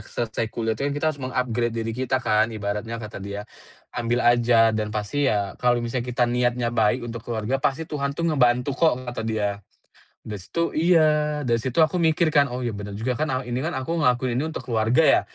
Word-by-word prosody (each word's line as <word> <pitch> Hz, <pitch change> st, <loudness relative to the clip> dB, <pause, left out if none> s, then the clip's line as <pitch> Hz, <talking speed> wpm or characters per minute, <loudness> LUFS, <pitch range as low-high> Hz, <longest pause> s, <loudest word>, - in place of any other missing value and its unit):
selesai 110 Hz, +1 st, -3 dB
kuliah 115 Hz, 0 st, -2 dB
tuh 140 Hz, +6 st, -2 dB
kan 145 Hz, -, -3 dB
kita 145 Hz, -, -2 dB
harus 140 Hz, -, -13 dB
meng-upgrade 120 Hz, -2 st, -1 dB
diri 115 Hz, 0 st, -2 dB
kita 130 Hz, +2 st, -1 dB
kan 110 Hz, -3 st, +2 dB
ibaratnya," 110 Hz, +1 st, -4 dB
kata 105 Hz, -3 st, -8 dB
dia, 100 Hz, +1 st, -6 dB, 0.5 s
"Ambil 120 Hz, +1 st, -1 dB
aja 120 Hz, -1 st, +5 dB
dan 110 Hz, -1 st, -1 dB
pasti 105 Hz, +7 st, -1 dB
ya 100 Hz, -2 st, 0 dB
kalau 120 Hz, -1 st, +2 dB
misalnya 125 Hz, +1 st, -3 dB
kita 125 Hz, 0 st, +1 dB
niatnya 120 Hz, 0 st, 0 dB
baik 120 Hz, +2 st, +2 dB
untuk 115 Hz, -1 st, -6 dB
keluarga, 120 Hz, +3 st, -2 dB
pasti 140 Hz, +5 st, 0 dB
Tuhan 140 Hz, -2 st, -3 dB
tuh 170 Hz, -, -2 dB
ngebantu 125 Hz, -1 st, +2 dB
kok," 135 Hz, -3 st, +1 dB
kata 125 Hz, -1 st, -5 dB
dia. 105 Hz, -2 st, -2 dB, 0.6 s
Dari 105 Hz, -2 st, -6 dB
situ 170 Hz, -, -2 dB
iya, 155 Hz, -3 st, +3 dB
dari 120 Hz, -3 st, +1 dB
situ 130 Hz, +7 st, 0 dB
aku 160 Hz, +3 st, +3 dB
mikir 165 Hz, -1 st, +3 dB
kan, 145 Hz, -2 st, +4 dB
"Oh, 125 Hz, -1 st, -5 dB
iya 120 Hz, -, -1 dB
bener 105 Hz, 0 st, -6 dB
juga 115 Hz, +4 st, -2 dB
kan, 155 Hz, -, 0 dB, 0.2 s
eee, 125 Hz, -, -9 dB
ini 120 Hz, -, -1 dB
kan 170 Hz, -, -2 dB
aku 130 Hz, +6 st, -2 dB
ngelakuin 125 Hz, -4 st, +1 dB
ini 150 Hz, -, 0 dB
untuk -, -, -4 dB
keluarga 115 Hz, +5 st, +3 dB
ya," -, -, +5 dB
120 Hz, 210 wpm, -24 LUFS, 110-140 Hz, 0.6 s, aja